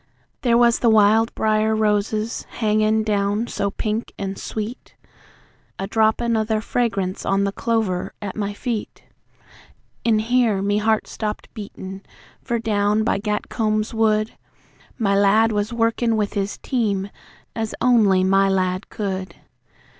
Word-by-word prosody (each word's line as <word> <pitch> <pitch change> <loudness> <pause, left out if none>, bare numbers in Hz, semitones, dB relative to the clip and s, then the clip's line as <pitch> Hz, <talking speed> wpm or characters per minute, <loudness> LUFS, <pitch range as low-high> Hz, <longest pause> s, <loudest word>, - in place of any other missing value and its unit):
There 235 -3 +3
was 235 -1 +4
the 235 - +3
wild 220 +1 +4
briar 220 0 +2
roses 215 +1 0
hangin' 215 0 +1
down 205 +1 0
so 200 -3 -2
pink 215 +3 -3
an' 195 -1 -4
sweet, 220 +5 -6 0.8
A 195 - -3
droppin' 225 +3 +1
o' 220 - +2
their 215 0 0
fragrance 200 -5 -1
on 195 0 +1
the 200 - 0
clover 215 -5 -1
at 200 -2 -6
my 205 -1 -2
feet 225 +1 -5 1.0
An' 225 -2 +3
here 225 -2 +2
me 205 +1 +1
heart 220 0 +1
stopped 210 -1 -5
beatin', 195 -3 -8 0.4
for 240 -2 -1
down 210 -1 +1
by 220 - +1
Gatcombe's 215 +1 -1
Wood 215 -1 +2 0.7
My 200 -4 +1
lad 210 +3 +4
was 210 +1 -1
workin' 230 0 +1
with 210 -1 -1
his 200 0 -2
team, 205 -6 -1 0.4
as 220 -1 -3
only 215 -7 +4
my 195 +1 +3
lad 185 0 -1
could! 190 -4 -4
215 Hz, 140 wpm, -22 LUFS, 200-225 Hz, 1.0 s, was